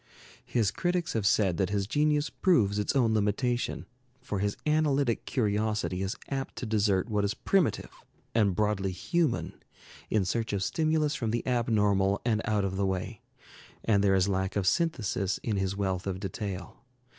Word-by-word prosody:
His 110 -5 +1
critics 175 +4 -1
have 110 -4 +1
said 95 -4 +2
that 95 - +1
his 100 -1 0
genius 150 +5 +1
proves 105 - +2
its 105 - -1
own 120 -5 +3
limitation, 110 +4 0 0.3
for 105 -6 -4
his 100 +1 -1
analytic 145 -5 +1
curiosity 105 -4 0
is 95 +1 -2
apt 135 -1 -3
to - - -5
desert 105 -3 +1
what 105 -3 0
is 100 0 0
primitive 190 -6 +1 0.4
and 105 -5 +2
broadly 105 -2 0
human 160 - -1 0.5
in 105 -3 +2
search 115 +2 -1
of 100 -1 0
stimulus 155 - +1
from 115 -5 -2
the 120 +1 -1
abnormal 105 -5 +2
and 110 -2 +1
out 105 -3 +1
of 95 -1 -3
the 100 - +1
way, 95 +3 -3 0.6
and 100 -3 +3
there 95 -1 +4
is 95 0 +3
lack 95 -1 -1
of 100 -2 0
synthesis 105 - 0
in 110 -3 -1
his 95 0 -1
wealth 95 -2 -1
of 95 -1 -2
detail. 95 -1 -5
105 Hz, 170 wpm, -29 LUFS, 95-125 Hz, 0.6 s, there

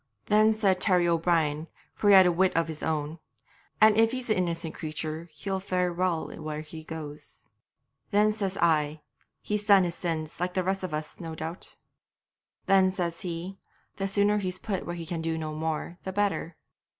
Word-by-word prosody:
'Then 215 +1 +4
said 195 -4 +2
Terry 180 -4 +3
O'Brien, 165 -2 +1 0.3
for 205 - +1
he 200 - +9
had 190 -1 +9
a 180 - +4
wit 185 +1 +2
of 165 0 +2
his 160 -2 -6
own, 155 0 -2 0.6
"And 215 0 +7
if 225 0 +5
he's 255 -3 -2
an 215 - +3
innocent 170 -3 -1
creature 155 +1 -4
he'll 190 +5 -3
fare 180 -2 -1
well 175 -2 0
where 155 0 -4
he 160 +1 -10
goes." 155 -2 -9 0.7
'Then 210 +1 +3
said 195 -3 -3
I, 155 -2 +2 0.4
"He's 210 0 -2
done 200 -2 +7
his 175 -1 -1
sins, 160 -3 -4
like 180 +1 -2
the 185 - +1
rest 190 +1 -1
of 185 -3 -4
us, 155 0 -6
no 165 -2 -6
doubt." 160 +3 -6 0.9
'Then 190 -1 +4
says 170 -3 -3
he, 180 +2 -5 0.4
"The 195 - -1
sooner 205 +1 +2
he's 185 -2 -2
put 195 -1 -4
where 175 - -3
he 170 -1 -6
can 165 0 -3
do 160 0 -1
no 155 -1 -4
more 160 +2 -3
the 190 - -4
better." 195 -4 -1
175 Hz, 185 wpm, -28 LUFS, 160-195 Hz, 0.9 s, he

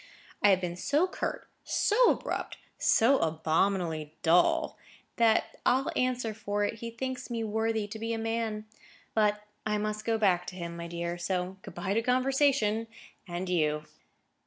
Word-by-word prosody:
I 205 - +6
have 190 -2 +5
been 175 -1 -4
so 295 - +2
curt, - - -4 0.2
so 460 +3 +3
abrupt, - - -2 0.2
so 260 +5 +4
abominably 160 0 0
dull, 175 +2 +3 0.4
that 230 -2 +3
I'll 260 +2 +2
answer 250 -3 0
for 205 -1 -2
it 210 +2 -2
he 235 - -5
thinks 260 +3 -5
me 230 -1 -2
worthy 220 0 0
to 220 - -7
be 225 +1 -3
a 230 - -1
man. 225 -1 -2 0.5
But 210 -1 +2 0.2
I 210 -1 0
must 215 0 -2
go 225 0 +1
back 180 -5 +2
to 180 - -6
him, 170 -2 -5
my 170 0 -6
dear, 170 0 -4
so 180 +1 -2
good 195 - -11
bye 175 +3 -2
to 225 - +2
conversation 255 -3 +2 0.4
and 175 +1 -4
you." 150 -4 +1
210 Hz, 160 wpm, -29 LUFS, 175-230 Hz, 0.5 s, I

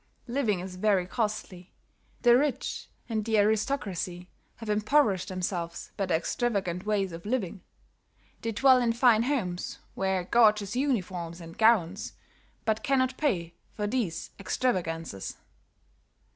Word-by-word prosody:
"Living 235 -6 0
is 180 0 -7
very 195 -2 +2
costly; 200 -3 -3 0.5
the 240 -1 +7
rich 280 +2 -1 0.2
and 220 -3 -1
the 220 0 +1
aristocracy 205 -5 0 0.3
have 225 - -10
impoverished 210 -2 +2
themselves 175 -2 -3
by 195 - -1
their 170 - +3
extravagant 195 -1 -1
ways 200 -3 +1
of 165 0 -8
living. 205 -4 -2 0.8
They 230 - -2
dwell 260 +3 +5
in 235 -1 +2
fine 235 -2 +5
homes, 230 -10 -2 0.2
wear 190 -1 0
gorgeous 210 0 +3
uniforms 185 - -1
and 165 -1 -10
gowns, 210 -4 +3 0.5
but 220 0 +1
cannot 260 0 +1
pay 175 - -1 0.2
for 210 - -2
these 205 -7 -2
extravagances. 165 - -2
210 Hz, 125 wpm, -28 LUFS, 180-235 Hz, 0.8 s, the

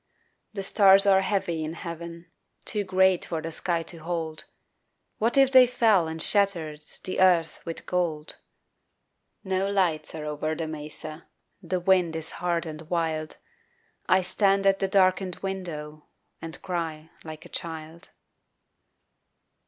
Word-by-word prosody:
The 195 - -3
stars 195 0 +6
are 190 -1 +5
heavy 190 -5 -1
in 155 +1 -4
heaven, 170 0 -8 0.3
Too 210 -1 -1
great 190 -1 +3
for 165 - -3
the 165 +1 -5
sky 170 +1 -2
to 165 +1 -9
hold 160 -1 -4 0.7
What 230 +4 +1
if 270 -1 +5
they 255 -1 +8
fell 220 -8 +3
and 160 0 -5
shattered 165 -6 +1 0.2
The 185 - -3
earth 170 -4 +3
with 165 - -6
gold? 165 -4 -2 1.1
No 190 0 0
lights 170 -6 0
are 155 -1 -5
over 150 +1 -2
the 165 - -3
mesa, 155 +1 -7 0.3
The 185 - -2
wind 180 -2 +2
is 160 0 -3
hard 175 -1 0
and 155 -1 -7
wild, 160 -3 -2 0.7
I 185 0 +4
stand 195 +1 +2
at 195 0 +4
the 195 - +1
darkened 185 -1 +2
window 155 -6 -5 0.3
And 165 0 -7
cry 165 -3 -4
like 155 -1 -9
a - - -12
child. 165 +1 -7
170 Hz, 140 wpm, -26 LUFS, 160-190 Hz, 1.1 s, they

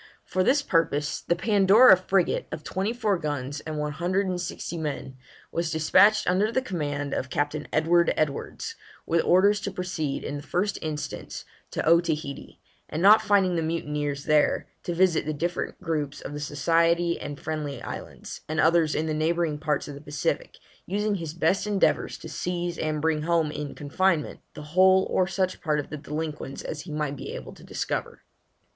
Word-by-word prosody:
For 185 - 0
this 285 +7 +3
purpose, 165 - 0
the 170 - 0
Pandora 200 +4 +6
frigate, 185 0 0
of 150 - -6
twenty 195 +4 -2
four 215 -6 0
guns 145 -2 -3
and 155 0 -6
one 150 0 -2
hundred 185 +6 0
and 180 -1 -2
sixty 175 - -5
men, 145 -4 -4 0.4
was 170 -1 -1
despatched 200 +7 +4
under 195 +5 +2
the 260 - +2
command 145 - -3
of 130 - -2
Captain 145 +2 -2
Edward 170 +2 +3
Edwards, 155 - -2 0.3
with 165 0 +2
orders 200 +3 +4
to - - -2
proceed, 180 -7 -3
in 145 - -4
the - - -6
first 185 +7 -1
instance, 155 -2 -5 0.2
to - - -3
Otaheite, 160 -4 +1 0.3
and 160 +3 -3
not 210 +2 +8
finding 195 -3 +3
the 165 - +1
mutineers 150 -3 -2
there, 150 -1 +2 0.2
to 175 - -3
visit 175 -4 +2
the 155 - -1
different 170 +4 -3
groups 150 -5 -2
of - - -7
the 145 - -5
Society 165 +4 +1
and 145 -1 -6
Friendly 150 -3 -4
Islands, - - -8
and 155 0 -1
others 160 -1 +3
in 155 - 0
the 155 - -1
neighbouring 160 0 0
parts 150 -2 -1
of 145 - -6
the 140 - -10
Pacific, 145 -1 -3 0.3
using 210 +3 0
his 165 -5 -4
best 175 +5 +1
endeavours 205 -2 +1
to - - -10
seize 175 -1 -3
and 155 -1 -2
bring 160 -1 +1
home 165 -1 +1
in 150 -1 -5
confinement 160 +2 0 0.2
the 150 - -8
whole 190 +1 +6
or 185 - +2
such 190 -1 -1
part 150 -3 +1
of 145 - -6
the 150 - -4
delinquents 150 -2 -5
as 150 - -5
he 175 - -9
might 150 -2 -2
be - - -7
able - - -8
to - - -16
discover. - - -4
165 Hz, 180 wpm, -26 LUFS, 150-185 Hz, 0.4 s, not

